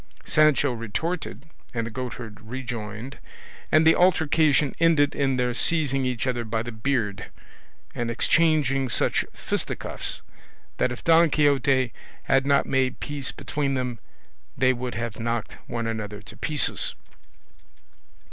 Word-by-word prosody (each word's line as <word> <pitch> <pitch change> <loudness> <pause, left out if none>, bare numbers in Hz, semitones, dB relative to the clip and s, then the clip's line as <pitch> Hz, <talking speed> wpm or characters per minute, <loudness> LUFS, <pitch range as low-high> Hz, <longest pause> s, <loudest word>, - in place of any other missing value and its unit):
Sancho 155 -3 +4
retorted, 140 - -4 0.3
and 115 -1 -1
the 115 - -6
goatherd 120 -3 -6
rejoined, 115 0 -6 0.5
and 155 +1 +5
the 160 - +7
altercation 155 -5 +3
ended 160 -4 +4
in 135 -2 0
their 125 -1 0
seizing 135 -1 +2
each 125 -2 -1
other 125 -2 -1
by 110 0 -2
the 120 - -6
beard, 110 -3 -1 0.7
and 120 -1 -2
exchanging 135 0 +2
such - - +1
fisticuffs - - -4 0.5
that 125 - +1
if 125 - -7
Don 165 0 +5
Quixote 135 -5 +2 0.3
had 135 0 +2
not 140 -1 +4
made 130 -1 0
peace 145 -2 -3
between 140 -2 -2
them, 125 -3 -3 0.6
they 130 0 +4
would 125 -1 -5
have 115 0 -4
knocked 115 -1 -3
one 115 -1 -3
another 105 -2 -4
to 105 - -12
pieces. 150 -3 +2
130 Hz, 130 wpm, -25 LUFS, 115-145 Hz, 0.7 s, the